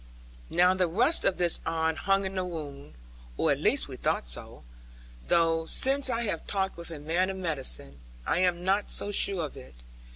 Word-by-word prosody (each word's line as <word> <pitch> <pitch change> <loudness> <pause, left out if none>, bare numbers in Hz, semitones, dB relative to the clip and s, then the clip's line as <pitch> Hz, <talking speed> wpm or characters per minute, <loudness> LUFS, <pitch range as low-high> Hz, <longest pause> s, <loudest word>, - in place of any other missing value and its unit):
Now 180 +1 +3
the 185 -1 0
rust 240 - +2
of 190 - +1
this 175 -2 +3
iron 160 0 -1
hung 195 +3 0
in 190 - -4
the 185 -1 -2
wound, 145 - -8 0.4
or - - +1
at - - 0
least - - +2
we - - -9
thought - - -2
so; - - -2 0.6
though 165 - +1
since 270 +5 +3
I 235 -1 -1
have 205 -7 -4
talked 190 -1 -2
with 170 0 -10
a 165 - -8
man 165 +6 -1
of 190 - -5
medicine, 135 - 0 0.3
I - - 0
am 180 -1 +1
not 195 +3 0
so 205 - +1
sure 195 -4 +1
of 145 - -10
it. 65 -1 -13
175 Hz, 195 wpm, -27 LUFS, 160-195 Hz, 0.6 s, Now